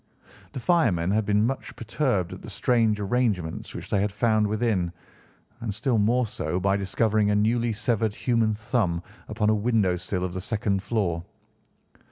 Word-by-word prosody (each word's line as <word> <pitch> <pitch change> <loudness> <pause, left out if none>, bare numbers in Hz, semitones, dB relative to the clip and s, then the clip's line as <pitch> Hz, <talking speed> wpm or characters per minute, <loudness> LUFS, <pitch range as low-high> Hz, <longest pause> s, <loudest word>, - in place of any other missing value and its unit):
The - - -4
firemen 115 - +2
had 110 +1 +1
been 105 +1 +3
much 135 +2 -3
perturbed 115 - -1
at - - -9
the - - -9
strange 115 -4 +2
arrangements 100 -6 -1
which - - -8
they 100 - +2
had 105 0 0
found 110 0 +2
within, 105 -5 0 0.7
and 115 -3 -3
still 115 +1 +1
more 120 +4 +3
so 95 -4 -3
by 95 +1 +2
discovering 105 +2 +1
a 105 - +2
newly 115 +3 +2
severed 110 -1 0
human 115 -3 +1
thumb 105 -6 -1 0.2
upon 110 0 +1
a - - +4
window 105 -4 +2
sill 90 +1 -3
of 90 - -5
the 95 - -4
second 100 -1 -1
floor. 95 -5 -1
105 Hz, 170 wpm, -26 LUFS, 100-115 Hz, 0.7 s, a